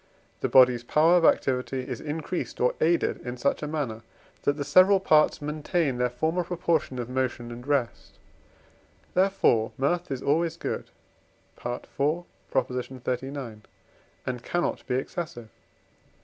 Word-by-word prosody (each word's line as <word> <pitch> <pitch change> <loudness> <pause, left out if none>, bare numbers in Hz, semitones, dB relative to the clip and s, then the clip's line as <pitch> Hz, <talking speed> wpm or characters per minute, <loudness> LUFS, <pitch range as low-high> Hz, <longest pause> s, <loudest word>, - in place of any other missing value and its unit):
the - - -1
body's 125 -2 +6
power 160 +7 +4
of 170 - +2
activity 130 -3 +2
is 125 -3 -5
increased 155 +3 -4
or 125 - +3
aided 170 +1 +2
in 125 0 -5
such 140 +3 0
a 150 - -3
manner, 140 -8 -3 0.4
that 145 - +2
the 145 - -2
several 185 +7 +6
parts 155 -5 +3
maintain 150 -2 -1
their 125 0 +2
former 160 +8 -1
proportion 170 -6 -1
of 120 -2 -3
motion 125 -2 -2
and 120 +2 -9
rest; 140 -5 -1 1.0
therefore 180 - +3
Mirth 175 +6 0
is 135 -2 -4
always 165 +3 +1
good - - -4 0.7
(IV. 120 0 -4 0.7
xxxix.), 125 -1 -3 0.6
and 125 -2 -3
cannot 175 0 -2
be 125 - 0
excessive. 130 - -4
140 Hz, 135 wpm, -27 LUFS, 125-160 Hz, 1.0 s, body's